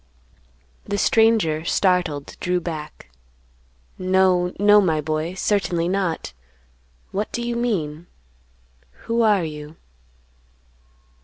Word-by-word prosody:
The 205 - -2
stranger, 215 -9 +3
startled, 175 -5 0
drew 180 0 0
back; 155 - -7 0.9
"No, 185 -1 +2
no, 205 +1 +6
my 160 -5 +1
boy, 155 +3 -2
certainly 180 -4 0
not; 185 - -2 0.8
what 205 +2 -3
do 240 - -3
you 240 - -2
mean; 175 -9 -2 1.0
who 230 0 0
are 210 -5 +3
you?" 150 0 -7
180 Hz, 95 wpm, -22 LUFS, 160-205 Hz, 1.0 s, no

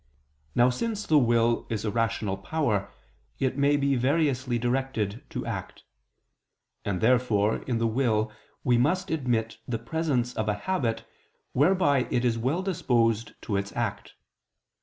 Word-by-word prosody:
Now 120 +1 +5
since 215 - -3
the 155 -2 +5
will 120 -2 +2
is 110 -1 -2
a 105 - 0
rational 115 -3 0
power, 105 -1 -1 0.5
it 130 - 0
may 145 +1 +3
be 140 -1 +2
variously 130 -2 +1
directed 120 -3 -1
to - - -4
act. - - -6 1.0
And 95 -3 -2
therefore 110 -3 +3
in 120 -3 0
the 115 - 0
will 110 -2 +1 0.3
we 120 -2 +3
must 180 +8 +1
admit 120 -7 -1
the 120 - -1
presence 125 -1 -1
of 110 -2 -1
a 105 - +1
habit 115 - -2 0.5
whereby 145 -3 +3
it 120 - 0
is 120 -2 +2
well 135 +11 -1
disposed 115 - 0
to 105 - -2
its 100 0 -3
act. - - -3
120 Hz, 145 wpm, -27 LUFS, 115-140 Hz, 1.0 s, Now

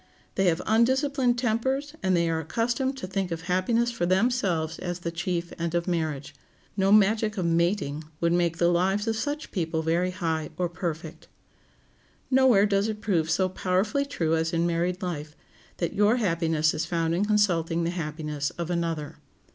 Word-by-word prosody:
They 195 - +1
have 165 -2 +2
undisciplined 255 +2 +2
tempers, 260 +5 -1
and 185 -1 +2
they 170 0 +2
are 165 -1 0
accustomed 240 - -1
to 260 - -5
think 190 0 -2
of 165 -1 -4
happiness 210 +7 +1
for 200 -7 -1
themselves 185 -6 +1
as 175 -1 -4
the 170 - -3
chief 170 0 -3
end 170 0 -2
of 170 +1 0
marriage. 155 -5 -2 0.4
No 195 -1 +2
magic 215 +1 +4
of 185 - -1
"mating" 170 -3 0
would 170 0 +2
make 170 -1 +1
the 170 0 +3
lives 190 +4 +1
of 225 - +1
such 290 +7 -3
people 165 -4 -1
very 170 +3 +1
high 165 -4 -2
or 175 -1 0
perfect. 165 -2 -5 1.0
Nowhere 255 -6 +5
does 200 0 +1
it 215 -1 -4
prove 175 -7 0
so 185 +3 +2
powerfully 195 +9 0
true 165 - 0
as 160 +1 -1
in 165 0 +1
married 175 +2 -1
life, 155 -4 -4 0.4
that 170 - -2
your 210 +3 +4
happiness 165 -7 +1
is 155 - -2
found 165 -1 -1
in 180 +4 +1
consulting 175 -6 +1
the 170 - 0
happiness 150 -3 -3
of 170 0 -3
another. 165 -3 -2
180 Hz, 175 wpm, -26 LUFS, 165-210 Hz, 1.0 s, Nowhere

